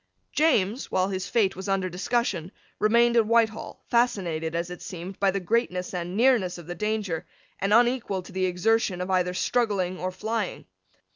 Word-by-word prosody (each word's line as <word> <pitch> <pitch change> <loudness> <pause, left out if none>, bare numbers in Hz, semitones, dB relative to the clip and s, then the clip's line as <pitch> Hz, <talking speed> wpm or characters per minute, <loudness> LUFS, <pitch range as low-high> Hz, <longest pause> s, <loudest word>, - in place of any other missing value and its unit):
James, 255 -7 +2
while 185 +1 +1
his 190 -1 -3
fate 210 -5 +2
was 190 +2 -6
under 195 -1 +1
discussion, 185 -2 -1 0.3
remained 235 +2 +4
at 225 -2 +4
Whitehall, 225 -1 +1
fascinated, 175 -10 0
as 170 +1 -2
it 180 - -8
seemed, 180 +2 -7
by 200 - +3
the 195 +1 0
greatness 185 -2 -1
and 180 +1 -4
nearness 230 -8 +3
of 175 - -10
the 175 - -5
danger, 210 -3 -2 0.3
and 195 +1 0
unequal 235 -4 +2
to - - -12
the 185 0 0
exertion 185 +1 +1
of 180 +1 -3
either 180 -1 +1
struggling 195 -6 0
or 185 - -2
flying. 215 +1 -3
195 Hz, 170 wpm, -26 LUFS, 180-225 Hz, 0.3 s, remained